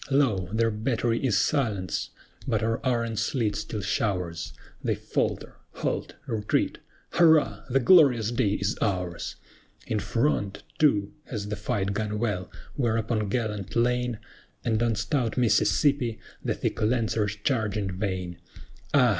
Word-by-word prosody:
Lo! 120 Hz, -10 st, +2 dB
their 115 Hz, +1 st, +2 dB
battery 115 Hz, +2 st, 0 dB
is 120 Hz, -7 st, +3 dB
silenced! 105 Hz, -5 st, 0 dB, 0.4 s
but -, -, +1 dB
our 115 Hz, 0 st, 0 dB
iron 115 Hz, -3 st, 0 dB
sleet 110 Hz, -1 st, 0 dB
still 105 Hz, +1 st, -4 dB
showers: 90 Hz, -, -1 dB, 0.3 s
They -, -, +1 dB
falter, -, -, -2 dB, 0.2 s
halt, -, -, -3 dB
retreat, 105 Hz, -2 st, 0 dB, 0.3 s
Hurrah! 160 Hz, -3 st, +4 dB
the 135 Hz, +2 st, +3 dB
glorious 125 Hz, -, +6 dB
day 115 Hz, -4 st, +1 dB
is 100 Hz, +1 st, 0 dB
ours! 90 Hz, -4 st, -1 dB, 0.5 s
In 110 Hz, -, -1 dB
front, 105 Hz, -1 st, 0 dB, 0.2 s
too, 105 Hz, -9 st, +3 dB
has 105 Hz, -4 st, -5 dB
the 105 Hz, -, -1 dB
fight 100 Hz, -1 st, -1 dB
gone 105 Hz, +1 st, -2 dB
well, 105 Hz, -5 st, -1 dB, 0.3 s
where 120 Hz, -5 st, +1 dB
upon 110 Hz, -2 st, -1 dB
gallant 105 Hz, -4 st, -2 dB
LANE, 125 Hz, 0 st, +1 dB, 0.5 s
And 110 Hz, -1 st, +1 dB
on 115 Hz, -1 st, +2 dB
stout 125 Hz, 0 st, -1 dB
Mississippi, 120 Hz, +1 st, +3 dB, 0.3 s
the -, -, 0 dB
thick -, -, -2 dB
Lancers 110 Hz, -2 st, +1 dB
charged 110 Hz, -1 st, 0 dB
in 100 Hz, -2 st, -1 dB
vain: 90 Hz, -3 st, -3 dB, 0.6 s
Ah! 125 Hz, -3 st, +6 dB
110 Hz, 140 wpm, -27 LUFS, 100-120 Hz, 0.6 s, glorious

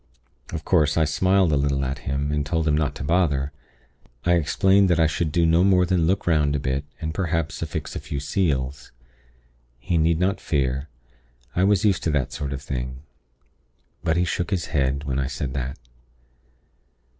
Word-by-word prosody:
"Of 80 Hz, -2 st, -5 dB
course, 75 Hz, -5 st, +3 dB
I 80 Hz, -, +4 dB
smiled 95 Hz, 0 st, +2 dB
a -, -, +3 dB
little 70 Hz, -1 st, 0 dB
at 65 Hz, +2 st, -3 dB
him, 70 Hz, +1 st, -1 dB
and 75 Hz, -1 st, 0 dB
told 80 Hz, +2 st, -1 dB
him 75 Hz, -, +3 dB
not 75 Hz, -2 st, 0 dB
to -, -, -6 dB
bother. 75 Hz, -4 st, +1 dB, 0.7 s
I 85 Hz, -, +4 dB
explained 95 Hz, +4 st, +3 dB
that 85 Hz, -1 st, +3 dB
I 80 Hz, -, +5 dB
should 80 Hz, 0 st, -1 dB
do 85 Hz, 0 st, +2 dB
no 85 Hz, +2 st, +4 dB
more 95 Hz, -2 st, +4 dB
than 85 Hz, -2 st, +1 dB
look 95 Hz, +3 st, 0 dB
'round 75 Hz, -4 st, +2 dB
a -, -, 0 dB
bit, 70 Hz, +1 st, -2 dB
and, 80 Hz, -2 st, -3 dB
perhaps, 80 Hz, -3 st, -2 dB
affix 80 Hz, -2 st, -4 dB
a -, -, -2 dB
few 70 Hz, -, -5 dB
seals. 70 Hz, -4 st, -1 dB, 0.9 s
He 80 Hz, +7 st, -1 dB
need 80 Hz, +1 st, +3 dB
not 95 Hz, +4 st, 0 dB
fear; 70 Hz, 0 st, -1 dB, 0.7 s
I 90 Hz, -, +3 dB
was 100 Hz, +1 st, +3 dB
used 100 Hz, -4 st, +2 dB
to 80 Hz, -, +2 dB
that 70 Hz, -4 st, -1 dB
sort 70 Hz, -1 st, -4 dB
of 70 Hz, 0 st, -5 dB
thing. 65 Hz, 0 st, -5 dB, 1.0 s
But 80 Hz, -1 st, +1 dB
he 90 Hz, -, +2 dB
shook 85 Hz, +1 st, -2 dB
his 95 Hz, -5 st, -1 dB
head 70 Hz, 0 st, +1 dB
when 65 Hz, -2 st, -2 dB
I 65 Hz, -, 0 dB
said 65 Hz, -1 st, -4 dB
that. 65 Hz, -1 st, -3 dB
80 Hz, 190 wpm, -24 LUFS, 70-85 Hz, 1.0 s, I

